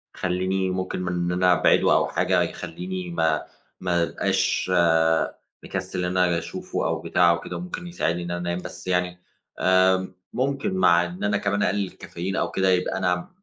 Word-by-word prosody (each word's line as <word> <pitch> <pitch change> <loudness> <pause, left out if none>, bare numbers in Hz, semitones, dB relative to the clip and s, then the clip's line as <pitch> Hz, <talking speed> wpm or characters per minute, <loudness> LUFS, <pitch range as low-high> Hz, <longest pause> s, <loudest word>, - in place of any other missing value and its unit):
يخلّيني 95 +1 -1
ممكن 95 0 -3
من 90 -1 -2
إن 85 0 -1
أنا 90 0 +4
أبعِده - - +4
أو - - +3
حاجة - - +1
يخلّيني 90 +2 -4
ما 80 -2 +1 0.4
ما 85 -2 +1
ابقاش 95 +1 0 0.9
مكسّل 90 - -3
إن 90 +1 -1
آجي 90 -2 +3
أشوفه 85 - -4
أو - - -2
بتاع 90 -1 +3
أو 85 - 0
كده، - - -6
وممكن 180 0 -6
يساعدني 90 - -1
إن 85 - -5
أنا 85 - -2
أنام 85 0 -2
بس - - -9
يعني، 90 -1 0 0.4
آآ، 95 0 +3 0.2
ممكن 135 -3 -1
مع 90 -2 +5
إن 90 +3 -7
أنا 105 0 +2
كمان 100 0 0
أقلل 100 0 0
الكافيين 95 +1 -6
أو - - -1
كده 95 0 +1
يبقى 90 -1 +1
أنا 90 -1 -1
90 Hz, 175 wpm, -24 LUFS, 90-95 Hz, 0.9 s, مع